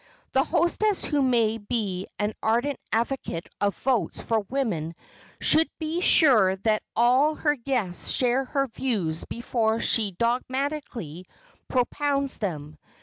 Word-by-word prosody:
The 265 - +3
hostess 350 +6 +1
who 290 -2 0
may 230 -4 +2
be 205 -4 -3
an 210 +1 -1
ardent 240 +5 0
advocate 230 -7 -2
of 200 -1 0
votes 240 -10 0
for 225 -1 0
women 190 - -2 0.4
should 320 +1 +4
be 320 +2 -2
sure 225 - +5
that 215 +2 0
all 255 +6 +4
her 295 -1 +1
guests 235 -8 -2
share 255 +1 +2
her 275 +1 0
views 215 -11 -2
before 230 -2 -1
she 220 -3 +3
dogmatically 245 - -2 0.4
propounds 275 +2 0
them. 155 -6 -5
240 Hz, 125 wpm, -25 LUFS, 205-275 Hz, 0.4 s, sure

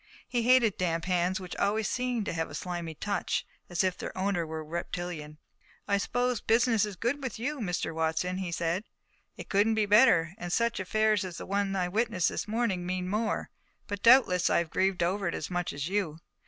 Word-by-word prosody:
He 240 - 0
hated 235 -3 +4
damp 165 -2 0
hands, 180 +1 +1
which 180 -1 -7
always 210 +1 +1
seemed 250 -4 -1
to - - -2
him - - -5
to 165 - -4
have 165 - -1
a - - -8
slimy 175 -3 -4
touch, 205 +5 -2 0.2
as 175 0 +1
if 185 -1 +1
their - - -7
owner 185 -3 0
were 160 0 -5
reptilian. 170 -2 -5 0.5
"I 200 -1 +2
suppose 245 +3 0
business 225 -2 +3
is 205 - -7
good 245 +9 -1
with 260 -4 -4
you, 280 +6 -3
Mr. 180 -6 -2
Watson," 160 +3 -1
he 185 -3 -3
said. 170 +5 -1 0.5
"It - - -8
couldn't 215 +2 +3
be 215 -1 +2
better, 205 -6 +5
and 175 0 -5
such 235 +3 +1
affairs 215 +2 +2
as 180 -2 -6
the - - -6
one 200 0 0
I 180 -2 0
witnessed 210 -1 +1
this - - -4
morning 215 -5 0
mean 180 0 -2
more. 215 +2 -1 0.3
But 205 -2 -5
doubtless 230 -8 +6
I - - +3
have 170 -1 -1
grieved 190 -2 +1
over 190 +2 0
it - - -1
as 155 - -5
much 175 0 -1
as 145 +1 -4
you. 185 -5 -1
190 Hz, 210 wpm, -29 LUFS, 175-220 Hz, 0.5 s, doubtless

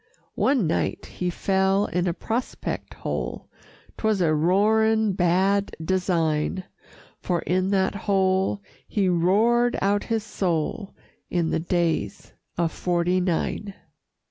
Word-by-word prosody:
One 260 -7 +2
night 160 - -1
he 180 - -3
fell 190 +2 +1
in 180 0 -1
a 170 - +1
prospect 235 +5 -4
hole - - -4 0.5
'Twas 220 -2 +1
a 165 -3 +2
roaring 215 +6 +3
bad 190 +3 +1
design 170 -1 0 0.6
For 175 -2 -1
in 185 +2 0
that 190 -1 +1
hole 195 0 +1 0.2
he 200 -3 0
roared 215 +8 +3
out 205 +1 +1
his 225 -2 -1
soul 190 0 -2 0.3
In 170 -2 0
the - - +1
Days 170 -1 -1 0.2
of 170 -1 +1
'Forty 175 +1 0
Nine. 190 +3 -2
190 Hz, 115 wpm, -24 LUFS, 175-205 Hz, 0.6 s, roaring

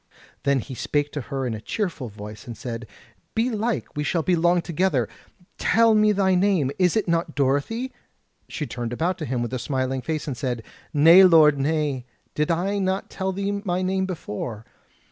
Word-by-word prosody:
Then 140 -2 +3
he 135 - -8
spake 145 +3 -1
to 145 - -4
her 135 0 -4
in 120 - -2
a 110 - -6
cheerful 165 - -3
voice 105 +2 -10
and 115 -3 -7
said: 115 -1 -6 0.5
"Belike 225 -1 -1
we 150 - -1
shall 165 +1 0
be 180 - +2
long 175 +1 +3
together: 170 - +1 0.5
tell 230 0 +4
me 215 0 +4
thy 195 -2 +2
name; 180 -7 +2
is 180 +2 +3
it 215 - 0
not 170 -1 0
Dorothy?" 145 - 0 0.6
She 150 - -4
turned 120 -3 -4
about 170 +8 -1
to 155 - -3
him 125 -3 -1
with 120 - -5
a 130 - -1
smiling 130 +1 -1
face, 155 +4 -3
and 140 - -3
said: 120 -2 -3 0.3
"Nay 165 +5 +8
lord, 155 -5 +6
nay: 145 -3 -1 0.3
did 150 +2 0
I 190 +5 0
not 190 0 -1
tell 190 -1 -2
thee 200 +1 -2
my 185 -2 -1
name 190 0 0
before? 115 - -5
155 Hz, 185 wpm, -24 LUFS, 130-190 Hz, 0.6 s, Nay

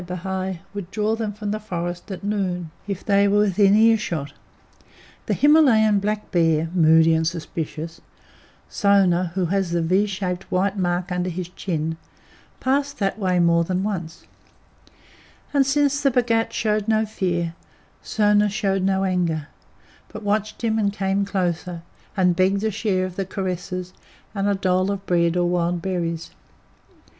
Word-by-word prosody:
Bhai!" 185 0 -4
would 200 -4 -6
draw 215 +2 0
them 220 -2 -3
from 210 0 -5
the 215 - -2
forest 175 -2 -5
at 190 0 -6
noon 185 -5 -2 0.2
if 200 -2 -5
they 200 -1 +4
were 205 +1 +3
within 200 0 +4
ear 225 +1 +5
shot. 145 -8 -4 0.9
The - - +1
Himalayan 240 -9 +5
black 210 +1 -3
bear, 165 -2 +2
moody 160 -1 +5
and 160 0 +1
suspicious 165 0 -5 0.7
Sona, 185 -4 +2
who 185 -2 +1
has 195 -3 0
the 170 0 0
V 190 +5 +2
shaped 185 -2 -4
white 190 +2 +1
mark 180 -1 -1
under 180 0 -1
his 180 0 -5
chin 165 -4 -3 0.6
passed 280 +2 0
that 195 +1 -1
way 185 -3 +1
more 170 -1 +4
than 185 +2 -1
once; 175 -6 -4 1.3
and 275 -2 +3
since 285 0 +2
the 275 - +4
Bhagat 235 -3 +1
showed 215 -1 0
no 220 0 +2
fear, 175 -5 -2 0.5
Sona 210 -1 +2
showed 195 -2 0
no 190 0 +1
anger, 170 -5 -1 0.6
but 215 - -9
watched 210 +2 -1
him, 220 -1 +1
and 200 -2 +1
came 195 0 0
closer, 180 -3 -2 0.3
and 180 -2 +3
begged 190 +3 +2
a 220 - +1
share 195 -3 0
of 185 -1 -8
the 195 - -1
caresses, 185 -1 -4 0.4
and 200 -1 -1
a 200 - +2
dole 185 0 +1
of 200 -1 -3
bread 170 -1 +2
or 175 0 +2
wild 175 0 0
berries. 170 -3 -3
190 Hz, 155 wpm, -22 LUFS, 175-210 Hz, 1.3 s, ear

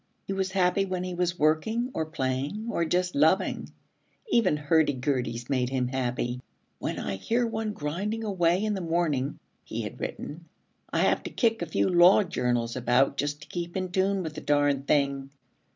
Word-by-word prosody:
He 195 - -3
was 190 -1 -2
happy 190 +1 +3
when 185 -2 -3
he 185 0 -4
was 175 0 -1
working 220 - +1
or 160 -1 -2
playing 145 - -2
or 170 - 0
just 180 +2 0
loving. 160 +7 +2 0.6
Even 210 - +3
hurdy 150 +1 +3
gurdys 125 -3 -2
made 125 -3 0
him 130 -2 -1
happy. 125 -1 -2 0.4
'When - - -3
I 95 - -3
hear 235 - 0
one 220 -2 -2
grinding 200 +9 -3
away 185 -2 +1
in 215 - 0
the 195 - -3
morning,' 160 -5 0 0.3
he - - -4
had - - -7
written, 165 +3 -6 0.5
'I - - +1
have - - +3
to - - -6
kick 225 -4 +1
a 170 - -2
few 155 - +1
Law 180 +3 +6
Journals 120 -9 -1
about 125 +2 +2
just 145 +1 -2
to - - -14
keep 175 0 -4
in 185 -1 -3
tune 190 +1 +1
with 160 -2 -5
the - - -7
darn 145 -1 +2
thing.' 140 -2 +1
165 Hz, 185 wpm, -27 LUFS, 140-190 Hz, 0.6 s, Law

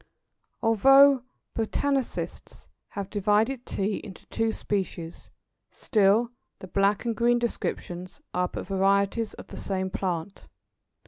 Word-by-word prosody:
Although 270 +4 +6 0.3
botanists 270 +4 -2 0.2
have 200 -1 -6
divided 215 +5 +1
Tea 200 +1 -1
into 195 -4 -10
two 225 0 0
species, 180 -6 -4 0.4
still 220 +1 +2 0.3
the - - -9
black 200 +4 +1
and 230 -1 0
green 240 +1 +3
descriptions 185 -5 -4
are 180 0 +1
but - - -6
varieties 200 +3 +1
of - - -12
the - - -9
same 190 -1 -2
plant. 180 0 -3
205 Hz, 115 wpm, -27 LUFS, 190-235 Hz, 0.4 s, Although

